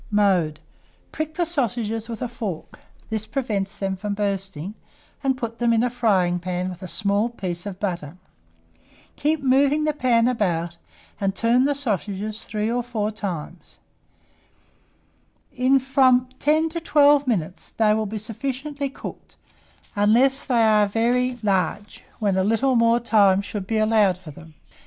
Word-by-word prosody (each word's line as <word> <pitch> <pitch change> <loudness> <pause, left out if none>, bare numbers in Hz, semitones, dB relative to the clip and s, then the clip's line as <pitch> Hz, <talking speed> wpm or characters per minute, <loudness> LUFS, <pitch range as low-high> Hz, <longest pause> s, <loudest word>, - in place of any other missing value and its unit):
Mode. 185 -7 +2 0.5
Prick 310 0 -4
the 350 - +1
sausages 235 -7 -2
with 230 0 -5
a - - -1
fork 220 -8 -6 0.3
(this 220 -1 -2
prevents 210 -7 -2
them 195 -1 -2
from 200 +2 -4
bursting), 195 -3 -3 0.5
and 265 -1 +1
put 230 -2 -5
them 240 -1 +2
into 230 +1 +3
a - - 0
frying 190 -8 +1
pan 180 +1 -3
with 180 0 -9
a 185 - -6
small 205 +4 0
piece 185 -5 -5
of 190 -2 -7
butter. 175 -5 -4 1.0
Keep 300 0 0
moving 275 +3 +3
the 305 0 +1
pan 245 -5 +2
about, 170 -8 -1 0.4
and 195 -1 -1
turn 235 +5 +3
the 285 0 +1
sausages 215 - -3
3 215 +1 -2
or 245 +1 0
4 220 -3 -2
times. 180 -5 -6 1.8
In 255 +2 +4
from 260 -1 +3
10 310 +2 +2
to 335 +1 -4
12 290 -3 +4
minutes 185 -7 -2
they 215 -1 +3
will 215 0 -1
be 215 +2 -5
sufficiently 275 +6 -4
cooked, - - -10 0.6
unless 240 +7 +4
they 240 -4 +2
are 215 -2 +4
very 245 +4 +1
large, 195 0 -1
when 200 -3 0
a 190 - +2
little 225 +6 +2
more 230 0 +4
time 205 -5 +4
should 200 -2 -6
be 225 - 0
allowed 215 -4 +3
for 180 -4 -11
them. 160 +1 -14
220 Hz, 155 wpm, -23 LUFS, 195-255 Hz, 1.8 s, In